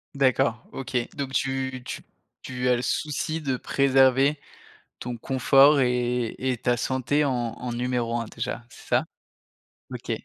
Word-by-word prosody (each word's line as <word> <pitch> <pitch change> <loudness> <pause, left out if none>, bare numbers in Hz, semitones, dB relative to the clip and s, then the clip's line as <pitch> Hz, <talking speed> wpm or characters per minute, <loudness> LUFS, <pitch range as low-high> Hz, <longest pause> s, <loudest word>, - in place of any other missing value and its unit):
D'accord. 125 -4 +2
OK. 130 -1 -3 0.2
Donc, 135 -2 -4
tu 130 -1 -1
tu - - -5 0.4
tu 125 -1 -3
as 125 - +5
le 120 - -2
souci 155 +4 -2
de 135 -4 -1
préserver 135 +2 +3 0.6
ton 125 -1 -5
confort 135 +4 +5
et 125 -2 0
et 130 -1 -1
ta 120 +1 +1
santé 130 +4 0
en 140 - +1
en 120 0 -3
numéro 120 -1 -1
1 115 - -3
déjà, 120 - -5
c'est - - -15
ça? - - +2 0.9
OK. - - -7
130 Hz, 145 wpm, -25 LUFS, 120-135 Hz, 0.9 s, as